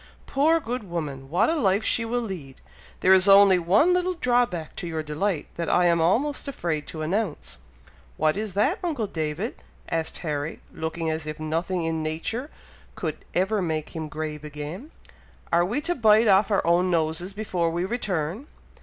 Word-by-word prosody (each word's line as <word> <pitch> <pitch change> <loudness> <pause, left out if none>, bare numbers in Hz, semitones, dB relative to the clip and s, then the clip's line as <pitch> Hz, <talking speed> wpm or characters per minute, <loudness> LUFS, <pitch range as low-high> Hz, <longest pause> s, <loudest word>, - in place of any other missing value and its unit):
Poor 315 +4 +3
good 250 -4 -4
woman! 145 -6 -4
what 185 +9 +3
a - - +2
life 205 - +2
she 230 - +1
will 240 +2 -1
lead! 165 -11 -7 0.4
There 190 - +6
is 190 +1 +5
only 195 -2 +7
one 205 - +4
little 360 0 +1
drawback 240 - 0
to 175 - -4
your 160 -1 -3
delight, 155 +3 -1
that 170 -1 -2
I 180 - +4
am 170 -1 +3
almost 255 - +1
afraid 170 - -3
to 155 -1 -5
announce." 160 - -3 0.6
"What 155 - +2
is 210 -2 -4
that, 260 - +2
uncle 300 -11 -1
David?" 160 +4 -4 0.3
asked 165 -1 -2
Harry, 150 0 -3
looking 160 0 -3
as 155 -1 -4
if 155 +1 -5
nothing 165 +3 -1
in 160 -1 -1
nature 165 - -3 0.5
could - - -3 0.2
ever 195 +3 +1
make 160 -3 -2
him 160 -1 -4
grave 150 0 -5
again. 150 - -7 0.6
"Are 170 +1 +5
we 210 +10 -1
to 345 +3 0
bite 220 -4 +5
off 200 +1 +5
our 200 - +1
own 175 +2 +3
noses 170 +3 0
before 185 -6 -1
we 170 +2 -1
return?" 190 - -3
180 Hz, 175 wpm, -25 LUFS, 160-220 Hz, 0.6 s, only